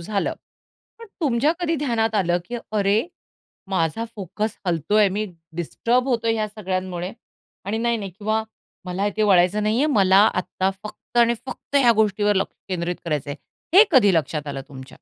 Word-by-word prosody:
झालं. 200 +3 -2 0.7
पण 460 - -11
तुमच्या 280 0 +2
कधी 335 -2 0
ध्यानात 225 -4 0
आलं, 175 -3 +2
की 240 +5 -5 0.2
"अरे 205 +1 +2 0.7
माझा 185 +4 0
फोकस 205 +3 -4
हलतोय, 180 +5 +2
मी 205 +3 -2 0.3
डिस्टर्ब 240 - 0
होतोय 230 -2 +1
ह्या 215 -1 -1
सगळ्यांमुळे. 185 -3 -4 0.5
आणि 215 +3 -2
नाही, 235 0 +1
नाही 200 -3 -5
किंवा 215 +1 0 0.4
मला 180 +1 -3
हे 205 - +1
ते 215 - +1
वळायचं 195 0 +4
नाही 215 +1 +1
आहे. 295 - +3
मला 195 -3 +5 0.2
आता 185 +1 -1
फक्त 215 - -11
आणि 235 0 +5
फक्त 280 - -4
ह्या 245 -4 +6
गोष्टीवर 205 0 +1
लक्ष 190 - -1
केंद्रित 175 -1 -2
करायचं 150 -4 -2
आहे." 155 - -6
हे 430 - +10
कधी 205 -8 +6
लक्षात 150 -1 -1
आलं 140 -1 -4
तुमच्या? 130 -2 -11
205 Hz, 170 wpm, -22 LUFS, 180-225 Hz, 0.7 s, हे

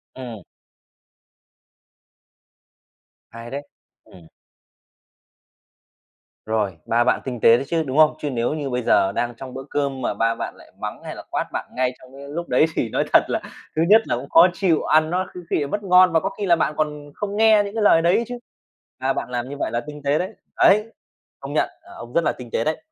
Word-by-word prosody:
Ừm. 120 -5 -8 2.9
Hay 115 +1 -9
đấy. 140 +1 -4 0.4
Ừm. 85 -3 -17 2.2
Rồi, 105 -5 -1
ba 120 +1 +2
bạn - - +1
tinh 125 -3 -4
tế 115 - +7
đấy 135 - -4
chứ, 165 0 0
đúng 135 -1 -4
không? 155 -1 +6
Chứ 150 - -3
nếu 120 +1 -1
như 145 -3 -3
bây 125 -1 -1
giờ 100 -3 +3
đang 120 +4 -2
trong 130 0 -9
bữa 135 - -6
cơm 140 -2 -2
mà 120 - -1
ba 115 +2 0
bạn - - -5
lại - - -17
mắng - - -5
hay - - -7
là - - -9
quát - - -1
bạn - - -4
ngay 130 0 0
trong 130 - -17
cái 140 +1 -10
lúc 170 +4 -5
đấy 125 +5 +4
thì 115 - -1
nói - - 0
thật - - +7
là - - -1 0.3
thứ 155 - +1
nhất 220 +2 +8
là - - 0
cũng 135 +3 -8
khó 165 +2 +7
chịu, 180 -4 +1
ăn 155 0 +3
nó 180 +2 -1
có - - -8
khi - - +1
lại - - -4
mất 205 +7 -3
ngon 180 -1 +6
và 160 - +5
có 195 - -2
khi 205 0 -5
là 175 -3 +5
bạn 155 - 0
còn 150 -1 -3
không 205 0 -4
nghe 220 -1 +6
những 200 +2 -7
cái 220 - 0
lời 165 -5 +6
đấy 175 +7 +3
chứ. 245 - -5 0.6
Ba 135 +1 0
bạn - - -4
làm 125 0 -3
như 145 - -7
vậy - - -2
là 120 - -1
tinh 150 0 -8
tế 145 +2 +2
đấy. 185 - -2 0.3
Đấy! 210 +2 +5 0.5
Công - - -7
nhận, - - +1
ờ, 350 +2 -16
ông 120 - -10
rất 170 - +2
là - - +2
tinh 120 -2 -11
tế 115 - 0
đấy. 155 - -1
145 Hz, 225 wpm, -22 LUFS, 125-175 Hz, 2.9 s, nhất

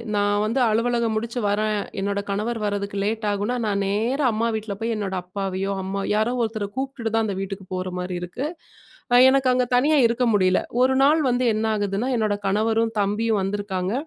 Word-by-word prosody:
நான் 205 0 +2
வந்து 230 +5 0
அலுவலகம் 230 0 +1
முடிச்சு 235 +2 -3
வரேன், 210 +1 0 0.2
என்னோட 200 +1 -1
கணவர் 215 +3 -2
வரதுக்கு 200 -1 -2
லேட் 215 +1 -1
ஆகும்னா, 205 +5 -1
நான் 200 -1 0
நேரா 235 +8 +1
அம்மா 230 +2 0
வீட்ல 215 -2 -5
போய் 230 0 -1
என்னோட 195 -2 -3
அப்பாவையோ, 195 +1 -3
அம்மா 195 +1 -3
யாரோ 220 +3 +1
ஒருத்தர 220 -3 -3
கூப்டுட்டு 265 -4 -3
தான் 225 0 +2
அந்த 195 -2 -3
வீட்டுக்கு 195 -1 -6
போற 185 0 -3
மாரி 180 0 -4
இருக்கு. 240 +11 -4 0.7
அ - - +8
எனக்கு 270 0 +2
அங்க 250 0 +2
தனியா 280 +5 +4
இருக்க 235 +2 +1
முடியல. 185 -2 +3 0.2
ஒரு 260 +1 +4
நாள் 295 +4 +5
வந்து 250 0 +1
என்ன 215 +1 -1
ஆகுதுன்னா 205 +3 -1
என்னோட 215 -3 +1
கணவரும், 220 +3 +1
தம்பியும் 210 +2 +1
வந்துருக்காங்க. 195 -1 -2
215 Hz, 180 wpm, -23 LUFS, 200-235 Hz, 0.7 s, அ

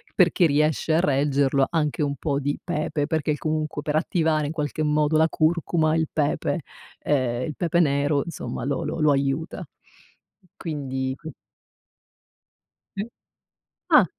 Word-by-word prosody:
per 180 -3 +5
chi 175 - +4
riesce 155 +2 +1
a - - +4
reggerlo 140 -3 +2
anche 155 -3 0
un 140 -1 0
po' 140 0 -1
di 145 +1 -1
pepe, 155 -3 -1
perché 155 -1 0
il 150 - -1
comunque, 155 -1 -2
per 150 0 -1
attivare 155 -2 +1
in - - -3
qualche 155 -1 -2
modo 150 +1 +2
la 160 +1 +4
curcuma, 160 0 +1
il 160 -1 +1
pepe 150 +1 0 0.4
uhm, 125 -4 +1
il 150 +2 -4
pepe 170 -1 +1
nero 145 -2 +2
insomma 170 - -5
lo 140 0 -1
lo - - -3
lo 155 -1 +4
aiuta, 140 +4 -1 0.9
quindi, 135 -5 -3
qu 160 +3 -9 1.7
Mh. 200 +3 -3 0.8
Ah,? - - +7
150 Hz, 150 wpm, -24 LUFS, 140-160 Hz, 1.7 s, Ah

